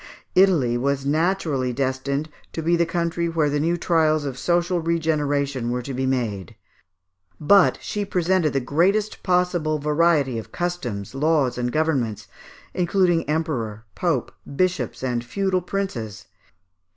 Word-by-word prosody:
Italy 155 -11 +4
was 140 +1 -1
naturally 155 -4 0
destined 135 +3 -2 0.3
to 165 - -4
be 170 +2 +3
the 170 -1 +1
country 170 0 -1
where 160 -3 +1
the 145 - 0
new 170 +3 +1
trials 155 -3 +2
of 135 -3 -3
social 175 +5 +1
regeneration 145 -6 0
were 125 0 -2
to 135 - -5
be 130 +1 -1
made; 110 -9 -2 0.8
but 190 +5 +5
she 210 - -3
presented 180 -4 +1
the 135 - +2
greatest 190 +11 +1
possible 180 -4 +1
variety 150 -4 +2
of 110 - -10
customs, 130 - -4
laws, 145 -3 +1
and 125 0 -2
governments, 120 -11 -1 0.5
including 175 -2 +1
Emperor, 125 -9 -2
Pope, 140 - -1 0.2
bishops, 175 -9 -1
and 120 -2 -1
feudal 185 +8 -1
princes. 115 - -4
155 Hz, 135 wpm, -23 LUFS, 130-175 Hz, 0.8 s, but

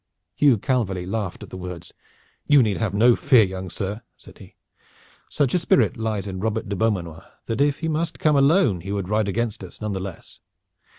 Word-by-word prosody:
Hugh 140 -5 +4
Calverly 100 -6 -1
laughed 100 -1 -4
at - - -12
the - - -7
words. 90 -2 -8 0.5
"You 145 -3 +6
need 105 -4 0
have 105 -3 -2
no 120 +3 +5
fear, 130 -5 +5
young 95 -1 -5
sir," 100 +3 -4 0.2
said - - -16
he. - - -15 0.7
"Such 140 -4 0
a 180 - +3
spirit 185 -2 +2
lies 110 -4 -2
in 95 -1 -5
Robert 110 +2 -2
de 100 - -3
Beaumanoir 90 -7 -1 0.2
that 115 +4 -2
if 145 +1 +1
he 165 - -1
must 160 +1 -2
come 155 -1 +2
alone 140 - +3
he 100 +3 -6
would 100 -2 -3
ride 105 -1 +1
against 110 0 -2
us 90 - -11
none 105 -1 -3
the 95 - -3
less. 95 -2 -9
110 Hz, 200 wpm, -23 LUFS, 95-130 Hz, 0.7 s, You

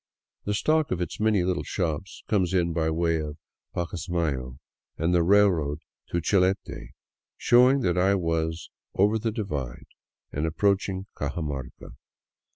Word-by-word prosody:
The 105 - 0
stock 155 +6 +2
of 90 - -1
its 90 - -4
many 105 -4 +3
little 90 0 0
shops 90 0 -3
comes 95 -4 +1
in 85 -2 +2
by 80 -1 +1
way 85 0 +1
of 75 0 -6 0.4
PacasmayC 80 -7 -2 0.4
and 85 +3 +1
the 90 - +4
railroad 85 -6 +3 0.3
to 85 - 0
Chilete, 95 +2 0 0.4
showing 125 +3 +5
that 90 -4 +1
I 95 +2 +4
was 80 -2 -2
" - - -68
over 105 +3 +3
the 115 +1 -1
divide 75 - -4 0.3
" - - -60
and 75 +3 -1
approaching 95 +2 0
Cajamarca. 70 -3 -5
90 Hz, 145 wpm, -26 LUFS, 80-100 Hz, 0.4 s, showing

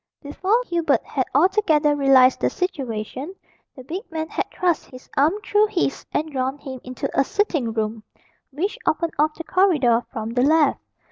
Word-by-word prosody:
Before 380 +10 0
Hubert 335 -6 +1
had 260 -3 -1
altogether 315 -3 +3
realised 270 -2 +5
the - - +1
situation, 270 - -4 0.4
the 260 - -11
big 345 +9 -5
man 315 -1 -4
had - - -3
thrust 350 -4 0
his 255 0 -13
arm 295 +5 +4
through 420 +1 +3
his, 355 -9 -1
and 310 +1 -2
drawn 265 0 -2
him 265 -3 -8
into 255 0 -4
a 275 - +3
sitting 305 - -1
room 220 0 -3 0.5
which 390 - -3
opened 330 +1 0
off 305 +1 +2
the 330 - -7
corridor 295 -12 +3
from 220 0 -4
the 245 +1 0
left. 300 +1 +3
295 Hz, 165 wpm, -22 LUFS, 260-345 Hz, 0.5 s, realised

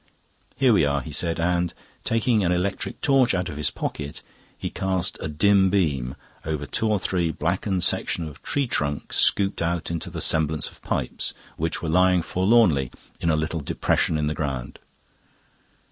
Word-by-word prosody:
"Here 130 -3 +4
we 95 - +4
are," 70 -1 +1
he 75 - -8
said, 85 +3 -1
and, 85 0 +1 0.3
taking 115 -1 +2
an 90 - +2
electric 90 +3 -2
torch 135 -7 +3
out 90 0 -1
of 75 - -7
his 75 - +1
pocket, 70 -1 -5 0.3
he - - -4
cast 95 -1 -1
a - - -2
dim 95 +5 +4
beam 70 -10 0 0.3
over 75 -2 -3
two 110 - 0
or 105 - +3
three 90 -3 0
blackened 90 +4 -1
sections 85 - +1
of 75 -1 -11
tree 140 -1 0
trunk, 75 - -2
scooped 100 -3 +3
out 85 0 -1
into 85 -2 -3
the - - -6
semblance 80 -1 +1
of - - -17
pipes, - - -3 0.2
which 80 +2 -2
were - - -2
lying 90 +1 +4
forlornly 90 - +3 0.3
in 85 - 0
a 80 - +3
little 80 +1 -1
depression 80 +2 0
in 75 - 0
the 75 - 0
ground. 70 -5 -4
85 Hz, 175 wpm, -24 LUFS, 75-95 Hz, 0.3 s, Here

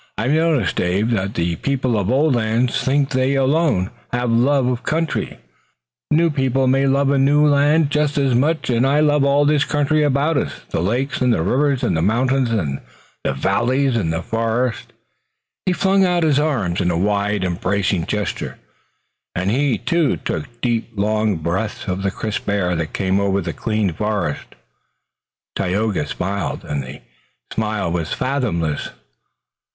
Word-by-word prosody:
I've 120 +6 0
noticed, 155 - +1
Dave, 95 +6 0
that 100 -3 -1
the 85 -1 -1
people 130 - -1
of 100 -2 -1
old 140 +3 +3
lands 120 +1 0
think 140 +1 +1
they 130 +1 +1
alone 135 - +1 0.2
have 120 -1 -1
love 130 +3 +3
of 125 -1 -1
country. 160 +1 -2 0.7
New 165 +2 +3
people 135 -2 +1
may 135 +1 +2
love 140 +1 +2
a 140 - +2
new 145 +2 +4
land 145 +1 +3
just 150 -1 0
as 135 -3 +2
much, 145 +3 +1
and 120 0 +2
I 145 +2 +3
love 150 -2 +3
all 140 +1 +3
this 150 0 +3
country 150 +1 +1
about 145 +2 +1
us, - - -1 0.2
the - - -1
lakes, 125 +10 -1
and 125 -1 +3
the 80 - +1
rivers, 135 - +1
and 105 -8 +1
the 80 - 0
mountains 125 +6 +1
and 80 -12 -2 0.4
the - - 0
valleys 120 - +1
and 95 -8 0
the 80 +1 -3
forests." 115 +2 -1 0.8
He - - +4
flung 195 +1 +2
out 175 -2 +2
his 150 -3 +3
arms 115 - 0
in 90 - +1
a 85 - 0
wide, 100 +1 0
embracing 90 0 -1
gesture, 105 -1 -3 0.8
and 90 +2 0
he, 135 -1 +1
too, 170 - +1
took - - -4
deep 120 -2 -1
long 105 0 +1
breaths 90 +9 -3
of 95 0 -2
the 100 - 0
crisp 105 +1 -4
air 90 -3 0
that 80 -2 -3
came 95 0 0
over 100 -1 +1
the - - -4
clean 110 -5 -1
forest. 105 -5 -3 1.0
Tayoga 100 -4 -1
smiled, 95 +5 -3
and 70 -1 -3
the 65 -1 -9 0.5
smile 105 -5 -1
was 85 -2 -2
fathomless. 110 - -1
120 Hz, 165 wpm, -20 LUFS, 100-140 Hz, 1.0 s, new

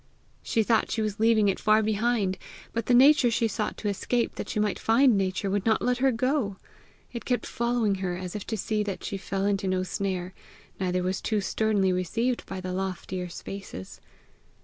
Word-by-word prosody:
She 225 - +1
thought 225 +1 +2
she 220 - -1
was 210 0 -3
leaving 220 -2 +4
it 195 - +1
far 215 0 +4
behind, 215 -2 0 0.3
but 230 -2 -2
the 250 - +3
nature 270 0 +6
she 230 0 +1
sought 210 0 -3
to 210 - -4
escape 230 +4 0
that - - -6
she 215 - -1
might 210 -1 0
find 240 +1 +4
Nature, 190 0 -1
would 200 -1 0
not 220 0 +3
let 250 0 0
her 265 +1 +4
go! 250 -4 0 0.6
It 235 - -5
kept 245 -1 -1
following 235 -3 0
her 180 -2 -2
as 180 0 -6
if 210 - -4
to 220 - -2
see 215 +2 -1
that 205 -2 -4
she 200 - -3
fell 195 0 -2
into 200 -1 0
no 185 0 +1
snare, 185 -1 -3 0.5
neither 180 -1 0
was 185 +1 -1
too 215 -2 0
sternly 200 -1 +1
received 225 +8 -1
by 190 - -5
the 185 0 -4
loftier 185 -1 -3
spaces. 185 - -8
205 Hz, 195 wpm, -27 LUFS, 190-230 Hz, 0.6 s, nature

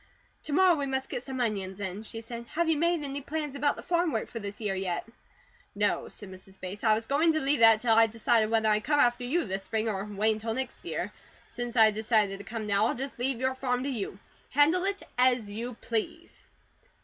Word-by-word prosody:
"To 295 - -3
morrow 370 +2 +6
we 285 -4 -1
must 265 0 -2
get 245 - -3
some 260 0 -6
onions 200 -5 -2
in," 195 0 -4
she 225 +1 -7
said. 235 +1 -8
"Have 340 +1 +2
you 325 - +3
made 335 0 +1
any 280 0 -4
plans 300 0 -4
about 290 +1 +1
the - - -9
farm 345 -1 +1
work - - -2
for 230 - -5
this 205 -1 -7
year 210 -3 -1
yet?" 190 -2 -2 0.7
"No," - - 0
said 200 -2 -9
Mrs. 190 +1 -13
Bates. 190 +2 -7
"I 220 -2 +5
was 225 +1 -3
going 310 +6 +3
to 315 - +1
leave 280 -2 +2
that 225 -1 +7
till 235 -2 +3
I 225 0 +6
decided 225 0 +2
whether 220 -1 +2
I'd 215 0 +2
come 295 0 +2
after 245 -2 +3
you 320 +6 0
this 195 -1 -3
spring 220 +2 -2
or 195 -3 -1
wait 210 +1 +1
until 220 +1 -4
next. 265 +1 -4 0.7
Since 240 0 -5
I 220 -2 +7
decided 210 -2 +1
to - - -8
come 220 +1 -5
now, 205 +1 +2
I'll - - -1
just 270 0 -5
leave 250 -1 0
your 260 +1 +1
farm 250 -1 -1
to 280 - -2
you. 210 -7 -4 0.3
Handle 315 +7 +4
it 400 0 0 0.2
as 245 -5 +3
you 230 +3 -5
please." 330 +10 -4
235 Hz, 230 wpm, -28 LUFS, 215-280 Hz, 0.7 s, that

